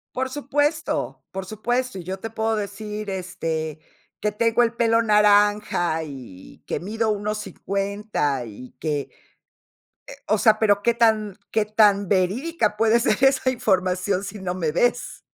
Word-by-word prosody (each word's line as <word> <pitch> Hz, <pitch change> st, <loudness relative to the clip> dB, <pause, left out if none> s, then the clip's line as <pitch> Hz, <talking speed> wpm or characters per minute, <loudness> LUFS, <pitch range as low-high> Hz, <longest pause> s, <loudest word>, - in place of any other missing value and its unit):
Por 260 Hz, +1 st, -1 dB
supuesto, 290 Hz, +3 st, -1 dB
por 190 Hz, 0 st, -5 dB
supuesto. 240 Hz, +2 st, -2 dB
Y -, -, -8 dB
yo 190 Hz, +2 st, -5 dB
te 225 Hz, -, -5 dB
puedo 225 Hz, 0 st, -1 dB
decir, 210 Hz, 0 st, -5 dB
este, 165 Hz, -5 st, -3 dB, 0.4 s
que 210 Hz, -, 0 dB
tengo 230 Hz, +3 st, +2 dB
el 230 Hz, 0 st, 0 dB
pelo 230 Hz, -1 st, +3 dB
naranja 205 Hz, -5 st, +3 dB
y 125 Hz, -11 st, -11 dB
que -, -, -3 dB
mido 220 Hz, +4 st, -2 dB
1.50 200 Hz, -, -2 dB
y 115 Hz, +4 st, -11 dB
que, 150 Hz, -2 st, -1 dB, 1.1 s
eh, -, -, -9 dB
o 215 Hz, 0 st, +3 dB
sea, 220 Hz, 0 st, +4 dB
pero, 205 Hz, -2 st, +3 dB
¿qué 235 Hz, 0 st, +2 dB
tan 215 Hz, -4 st, +2 dB
qué 220 Hz, -1 st, +1 dB
tan 205 Hz, -2 st, +3 dB
verídica 210 Hz, -, 0 dB
puede 225 Hz, +2 st, +4 dB
ser 270 Hz, -, +1 dB
esa 270 Hz, -1 st, +4 dB
información 190 Hz, -3 st, 0 dB
si 205 Hz, +1 st, -7 dB
no 180 Hz, -1 st, -3 dB
me 160 Hz, -4 st, -1 dB
ves? 245 Hz, +7 st, 0 dB
210 Hz, 150 wpm, -23 LUFS, 185-225 Hz, 1.1 s, sea